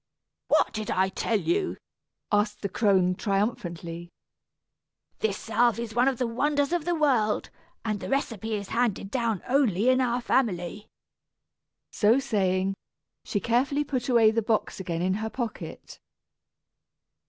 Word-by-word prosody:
"What - - +3
did 215 -1 -4
I 190 +1 +2
tell 215 +3 0
you?" 365 - 0 0.5
asked 210 0 +1
the 200 - -1
crone, 190 -3 +3
triumphantly. 180 -5 -2 1.1
"This 210 -3 0
salve 235 +1 +2
is 230 -1 -5
one 245 +3 +3
of 270 -2 +1
the 250 - 0
wonders 285 +6 0
of 345 -3 0
the 350 0 +1
world, 255 -9 +1 0.3
and 215 -2 -1
the - - -6
recipe 225 -6 -1
is 200 -2 -5
handed 225 -4 0
down 230 -6 -1
only 250 -5 +3
in 255 0 +4
our 245 -1 +1
family." 210 -5 -1 1.0
So 220 +3 +4
saying, 195 -7 +1 0.5
she 205 - -1
carefully 260 +7 +1
put 260 -3 -3
away 230 -3 +5
the 230 +1 +1
box 215 -2 -1
again 175 -2 -3
in 185 +1 +1
her 220 - -2
pocket. 235 -2 -6
225 Hz, 140 wpm, -27 LUFS, 200-250 Hz, 1.1 s, away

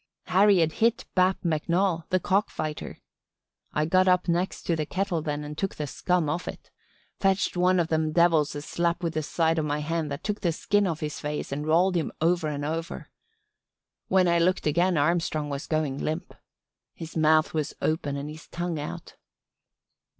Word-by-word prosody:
Harry 195 +2 +5
had 165 -2 +3
hit 230 +6 +1
Bap 185 +1 +3
McNoll 170 +2 0
the 185 - +2
cock 195 +3 +1
fighter. 155 -1 -5 0.7
I 150 - 0
got 185 +3 +3
up 180 0 +3
next 175 +2 -1
to 170 - 0
the 155 -2 -2
kettle 185 -3 -1
then 150 -1 -3
and 150 0 -7
took 195 +4 -2
the 150 - -3
scum 175 +3 0
off 155 +4 -2
it. - - -8 0.5
Fetched 195 -1 +1
one 180 +1 +3
of 170 -1 0
them 155 -1 +1
devils 165 -3 +3
a 145 - -5
slap 170 +2 -1
with 165 -1 -1
the 155 - -1
side 165 +2 +1
of 155 - -1
my 145 0 -1
hand 155 +1 -2
that 140 +2 -5
took 210 -1 -3
the 170 -4 +1
skin 205 +4 +1
off 165 -3 -3
his 150 -1 -4
face 150 -1 -4
and 145 +2 -3
rolled 175 +4 +4
him 165 - 0
over 170 0 +2
and 145 -1 -3
over. 165 +3 -4 1.0
When 185 -1 +3
I 170 0 +3
looked 180 +2 +1
again 175 +3 +2
Armstrong 155 -1 0
was 140 +1 -4
going 155 -4 -1
limp. 155 +3 -3 0.6
His 165 -1 -9
mouth 155 0 +3
was 155 -2 -2
open 150 -3 -1
and 140 +1 -5
his 155 +2 -10
tongue 175 -2 -3
out. 145 - -7
165 Hz, 190 wpm, -26 LUFS, 155-180 Hz, 1.0 s, Harry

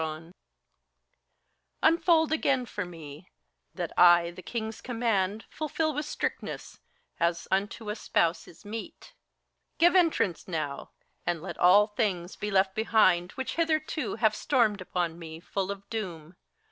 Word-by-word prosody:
Unfold 325 -1 +4
again 275 -5 +1
for 205 -4 -4
me, 165 -1 -11 0.5
that - - -3
I 175 -1 +6
the 175 - -11
King's 220 +1 -5
command 225 -4 -1
Fulfil 310 +1 -1
with 295 +1 -3
strictness, - - -4 0.4
as 170 0 0
unto 205 +3 -1
a - - -4
spouse 170 -5 0
is 170 - -16
meet: 220 +2 -8 0.6
Give 345 +2 +5
entrance 325 - +2
now, 155 -5 -4 0.3
and 175 -1 -1
let 180 - -7
all 190 +4 +7
things 205 -5 -2
be 210 - -4
left 190 -1 +2
behind 190 -5 +3
Which 265 +4 -4
hitherto 315 -1 0
have 220 -1 +2
stormed 220 -8 +1
upon 175 -2 -2
me, 160 -1 -8
full 190 +2 -3
of 200 0 -6
doom! 180 -7 -5
205 Hz, 135 wpm, -28 LUFS, 175-245 Hz, 0.6 s, all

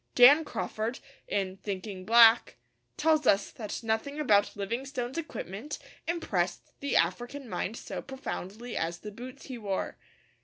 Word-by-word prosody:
Dan 280 +6 +9
Crawford, 230 -4 -3 0.3
in 190 -2 -1
Thinking 195 -1 -5
Black, 230 0 +7 0.4
tells 310 -3 +3
us 195 - +4
that 215 +1 -6
nothing 225 +7 -1
about 210 -8 +3
Livingstone's 245 +6 -3
equipment 285 - -5 0.3
impressed 190 - -1
the 280 - -1
African 240 +11 0
mind 225 0 -3
so - - -5
profoundly 240 -4 -6
as 170 +1 -1
the 210 - -7
boots 250 +5 -9
he 255 -3 -6
wore. 200 -3 -3
230 Hz, 130 wpm, -30 LUFS, 200-270 Hz, 0.4 s, Dan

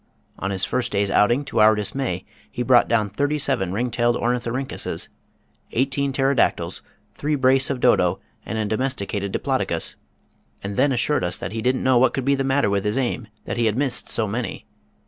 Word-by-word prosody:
On 95 - -2
his 95 -1 0
first 120 -2 -1
day's 100 0 0
outing, 120 +9 +3
to - - -2
our 110 0 +6
dismay 105 -3 -2 0.2
he 125 - -3
brought 120 0 +5
down 110 -4 +1
thirty 145 +7 0
seven 95 -10 0
ring 120 +5 -1
tailed 120 +1 +1
ornithorhyncusses, 125 +2 -2 0.6
eighteen 135 +3 0
pterodactyls, 135 -1 +1 0.3
three 150 +8 -1
brace 130 -1 +3
of 135 -3 -2
dodo, 90 -8 +3 0.2
and 110 - -4
a 110 - 0
domesticated 105 -4 -2
diplodocus, - - -1 0.7
and 100 0 -4
then 140 +7 +3
assured 130 0 +1
us 90 -1 0
that 85 - -5
he 110 +1 -3
didn't 125 +2 0
know 130 -2 +4
what 120 -1 +3
could 135 - -2
be 140 - +3
the 135 -1 0
matter 135 -2 +2
with 100 -1 0
his 105 +4 -1
aim 125 -3 -1 0.2
that - - -4
he 120 -1 +2
had 110 +1 0
missed 135 -3 0
so 110 -2 +2
many. 110 0 -4
120 Hz, 190 wpm, -22 LUFS, 105-135 Hz, 0.7 s, our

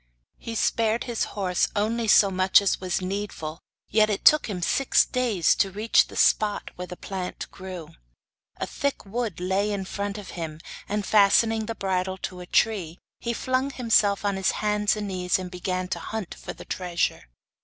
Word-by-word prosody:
He 230 - -6
spared 225 +1 +1
his 240 -3 -1
horse 185 -3 +1
only 225 +2 0
so 200 -1 +6
much 185 0 +5
as 200 -1 0
was 185 0 -1
needful, 185 -5 -4 0.3
yet 215 -1 +3
it 205 - -2
took 305 -5 +6
him 180 -4 -3
six 275 +8 +3
days 235 -9 +2
to 195 - +2
reach 210 +4 +3
the - - -12
spot 210 -1 +2
where 180 0 -6
the 180 0 -8
plant 185 -2 -5
grew. 185 -4 -8 0.7
A - - -2
thick 280 -5 -3
wood 215 -3 -3
lay 190 +3 0
in 195 -2 -3
front 200 +1 -4
of 205 -2 -8
him, 160 -3 -6 0.3
and, 210 -1 -1
fastening 220 +1 +4
the 230 - -3
bridle 190 -1 -1
tightly - - -4
to 180 - -11
a 180 - -8
tree, 185 -7 +1 0.2
he 235 - -2
flung 255 +3 0
himself 215 -6 +2
on 200 -1 0
his 190 - +1
hands 210 0 +2
and 210 -1 -3
knees 180 -2 0
and 185 -1 -6
began 185 0 -3
to - - -2
hunt 220 -5 -5
for - - -8
the - - -12
treasure. 175 - -2
200 Hz, 185 wpm, -25 LUFS, 185-220 Hz, 0.7 s, so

